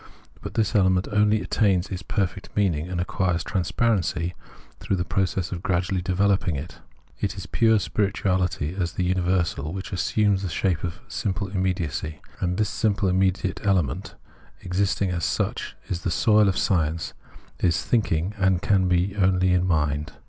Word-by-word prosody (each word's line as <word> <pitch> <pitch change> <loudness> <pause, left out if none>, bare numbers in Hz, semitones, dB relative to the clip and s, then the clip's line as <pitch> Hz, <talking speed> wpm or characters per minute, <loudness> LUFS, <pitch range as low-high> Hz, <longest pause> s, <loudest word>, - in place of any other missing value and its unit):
But - - -7
this 110 -3 +1
element 95 -2 +3
only 105 +1 +3
attains 100 -3 +1
its 95 -1 -4
perfect 95 -1 -2
meaning 85 -6 +1
and 90 -1 -2
acquires 90 -2 0
transparency 90 -2 0 0.5
through 100 - -1
the 90 -1 -2
process 95 -2 -1
of 85 -2 -4
gradually 90 0 0
developing 95 -1 +1
it. 75 +5 -7 0.4
It - - -2
is - - -6
pure 110 -1 +3
spirituality 95 -5 0
as 90 -3 -2
the 90 - -1
universal 90 -4 0
which 95 0 -6
assumes 100 +1 +1
the 95 - -3
shape 85 +1 0
of 85 -2 -4
simple 95 0 -2
immediacy; 90 -5 -2 0.2
and 90 0 -1
this 105 - +2
simple 105 -2 +1 0.5
element, 90 -10 0 0.5
existing 95 +1 0
as 85 -2 -2
such, - - -1
is 90 -1 -3
the 90 - -1
soil 105 +3 +4
of 95 - -1
science, 80 -3 0 0.5
is 85 -6 +1
thinking, 95 -5 +1
and 95 -1 +2
can 95 -3 +3
be 90 +2 +1
only 95 -1 +3
in 90 0 +2
mind. 75 -2 0
95 Hz, 155 wpm, -25 LUFS, 85-100 Hz, 0.5 s, soil